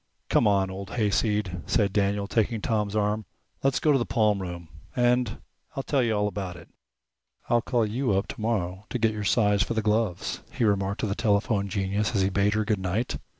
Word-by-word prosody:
"Come 115 - +4
on, 95 -2 +2
old 95 0 -7
hayseed," 105 -4 0
said 100 -4 +2
Daniel, 100 0 +1
taking 110 +1 0
Tom's 105 -1 -1
arm. 105 0 0 0.4
"Let's 135 -1 +2
go 155 - +3
into 140 - +4
the 120 - 0
palmroom, 95 -6 0 0.3
and 120 -2 +2 0.4
I'll 135 - -2
tell 140 -1 +1
you 115 -3 +1
all 105 0 +1
about 95 -3 -4
it." 85 -1 -13 0.8
"I'll 120 0 +4
call 120 -2 +1
you 115 +1 0
up 95 +1 +1
tomorrow 100 -3 -2
to - - -2
get 110 -2 +2
your 105 -1 -4
size 105 -1 +3
for 115 - 0
the 110 - 0
gloves," 105 -3 0
he - - -2
remarked 100 -1 +1
to - - 0
the 100 - -1
telephone 100 -2 +1
genius 100 +3 -1
as 100 - +3
he 95 - +2
bade 100 +2 +2
her 110 0 +1
good 105 -2 0
night. 95 +6 -2
105 Hz, 200 wpm, -26 LUFS, 100-115 Hz, 0.8 s, Come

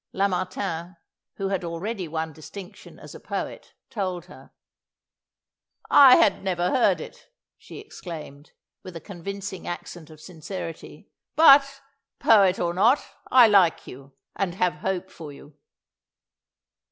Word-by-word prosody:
Lamartine, 185 -2 -3 0.4
who 195 -1 -3
had 195 -2 -2
already 180 +3 -5
won 160 0 -4
distinction 180 +6 -12
as - - -13
a - - -11
poet, - - -7 0.2
told 185 -5 -4
her. - - -16 1.4
"I 270 -3 +9
had 195 - +2
never 180 -2 -1
heard 255 - +2
it," - - -12 0.3
she - - -13
exclaimed, 160 - -10 0.3
with 185 -2 -11
a - - -6
convincing 195 +1 -8
accent 175 -1 -8
of 155 -1 -15
sincerity; 165 0 -9 0.2
"but, 275 -3 +6 0.4
poet 195 -4 +4
or 170 -1 -1
not, 230 +10 +3 0.2
I 255 -2 +7
like 195 -6 +3
you, 135 +2 -13 0.2
and 180 -3 -2
have 180 -4 0
hope 190 0 -3
for 155 -3 -10
you." 145 +1 -15
185 Hz, 130 wpm, -24 LUFS, 165-200 Hz, 1.4 s, I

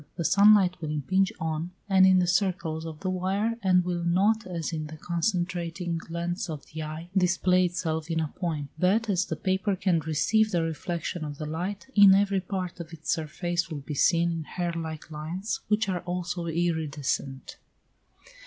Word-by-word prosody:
The 170 - -3
sun 205 +4 +7
light 180 -3 +1
will 155 - -3
impinge 185 +6 +1
on 160 +1 -2 0.2
and 190 -1 +6
in 185 0 +6
the 180 - +3
circles 175 -3 0
of 155 -1 -8
the 190 - -1
wire, 195 +5 -1
and 180 -2 +3
will 175 -1 -2
not, 200 +6 +2
as 170 -2 -4
in 155 -1 -3
the 155 +1 -9
concentrating 175 -1 -2
lens 170 +2 -3
of 150 -3 -6
the 160 - -4
eye, 155 +3 -6
display 185 0 +3
itself 160 -2 -2
in 165 -1 0
a 155 -2 -1
point; 155 -5 -3
but, 205 +5 +2
as 185 -1 +1
the - - -3
paper 190 +1 0
can 185 -2 +1
receive 160 +8 +2
the 175 -5 +1
reflection 170 +1 -3
of 145 -2 -6
the 155 - -5
light 180 +6 -4
in 200 -2 +8
every 200 -1 +2
part 185 -1 -4
of 170 -1 -7
its 160 -1 -4
surface 170 +2 -2
will 150 -3 -5
be 150 - -6
seen 170 +4 +3
in 165 -1 -3
hair 175 +1 -3
like 160 -1 -6
lines, 165 +8 -4
which 215 +1 +1
are 185 -2 -1
also 175 -1 -3
iridescent. 155 -5 -2
175 Hz, 185 wpm, -27 LUFS, 160-185 Hz, 0.2 s, in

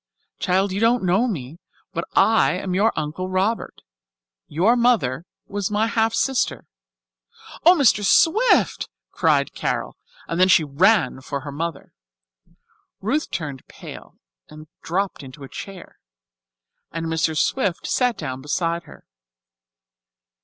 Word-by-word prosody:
Child, 190 +2 +1
you 195 - -2
don't 230 +1 +2
know 190 +7 +2
me, 155 - -5 0.3
but - - -3
I 220 -3 +4
am 185 +1 -3
your 205 +5 +3
Uncle 160 +5 -3
Robert. 195 +5 -2 0.6
Your 190 +11 +2
mother 220 - +1 0.2
was 200 -1 -3
my 210 +1 +1
half 225 0 +1
sister." 265 +2 0 1.0
"Oh, 355 - +9
Mr. 255 - +3
Swift!" 410 - +3 0.2
cried - - +1
Carol, - - -3 0.3
and 165 - -3
then 185 - +6
she 185 -3 +5
ran 150 - +2
for 140 +1 -5
her 145 +1 -7
mother. 160 0 -5 1.1
Ruth 275 +10 -1
turned 145 -5 -5
pale - - -12 0.3
and 155 0 -12 0.2
dropped 190 +2 -2
into 135 +1 -11
a - - -8
chair, 190 +5 -10 0.9
and 165 0 -4
Mr. 160 -1 0
Swift 195 - 0
sat 250 -2 +1
down 130 -4 -5
beside 170 +4 -2
her. - - -15
185 Hz, 130 wpm, -22 LUFS, 155-225 Hz, 1.1 s, Oh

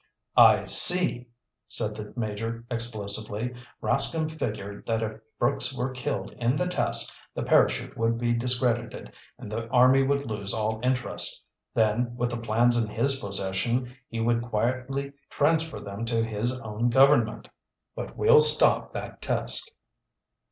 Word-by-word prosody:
"I - - +7
see!" 175 -9 +1 0.4
said 105 0 -2
the 105 -1 -8
Major 115 0 -4
explosively. 110 0 -2 0.3
"Rascomb 160 -1 +1
figured 105 -9 -6
that 115 -1 0
if 110 0 -5 0.2
Brooks - - 0
were 130 +2 -2
killed 130 +2 -4
in 120 +2 +1
the 180 - 0
test, 180 - +1 0.2
the - - -3
parachute - - +2
would 115 0 0
be 120 0 0
discredited, 120 -1 0 0.2
and 105 - -10
the 115 +1 -4
army 130 +3 +5
would 140 +1 0
lose 105 -3 -3
all 110 0 -2
interest. 125 -1 -1 0.3
Then, 115 +2 +1
with 120 0 -2
the 120 - -3
plans 120 +1 +2
in 110 - -6
his 135 +5 +2
possession, 100 +5 -2
he 115 - -6
would 115 +1 +1
quietly 130 +4 -2 0.2
transfer 160 +2 0
them 100 +2 -7
to 115 -1 0
his 115 +4 -2
own 110 +2 -2
government. 130 -3 +3 0.5
But - - -7
we'll 460 +1 +6
stop 460 0 +6
that - - -7
test!" 460 - -2
120 Hz, 145 wpm, -26 LUFS, 110-130 Hz, 0.5 s, I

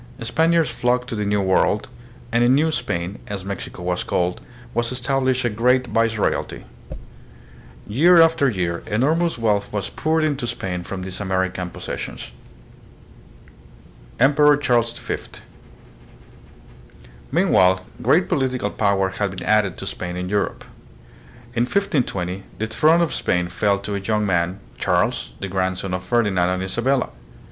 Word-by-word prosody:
Span 160 +8 +1
iards 165 -1 +4
flocked 125 +1 0
to - - -3
the 105 -1 -2
New 105 0 +1
World, 95 +2 +2 0.4
and 115 +1 +3
in 125 +2 +5
New 160 +3 +2
Spain, 90 - -3
as 100 -2 -5
Mexico 100 -2 -6
was 90 0 -1
called, 90 0 -1 0.3
was 120 +1 0
established 130 0 0
a - - +2
great 125 +4 +2
vice 115 -1 +1
royalty. 105 - -1 1.2
Year 165 - +5
after 165 -4 +5
year 90 -6 -2
enormous 155 +10 +1
wealth 105 -3 0
was 105 -2 -3
poured 160 0 0
into 140 -5 -1
Spain 90 -5 -3
from 95 +1 -6
these 95 0 -6
American 95 -2 -1
possessions. - - -6 1.9
Emperor 145 +3 +5
Charles 120 -5 +2
V. - - -3 2.1
Meanwhile 95 0 +3 0.2
great - - +3
political 130 -6 -1
power 100 -2 +1
had 100 +1 -2
been 95 -1 -7
added 105 -4 +2
to - - -6
Spain 90 -1 -5
in 90 0 -4
Europe. 105 0 -1 0.9
In 120 0 +1
1520 125 - -1 0.2
the 110 - -1
throne 155 +10 +3
of 170 - 0
Spain 90 -1 0
fell 100 +1 +1
to 100 +1 -5
a 100 - -1
young 105 +2 0
man, 90 0 0 0.2
Charles, - - 0
the - - -4
grandson 95 0 -2
of 90 - -2
Ferdinand 95 -3 +1
and 90 0 -1
Isabella. 125 +7 0
105 Hz, 145 wpm, -22 LUFS, 95-130 Hz, 2.1 s, in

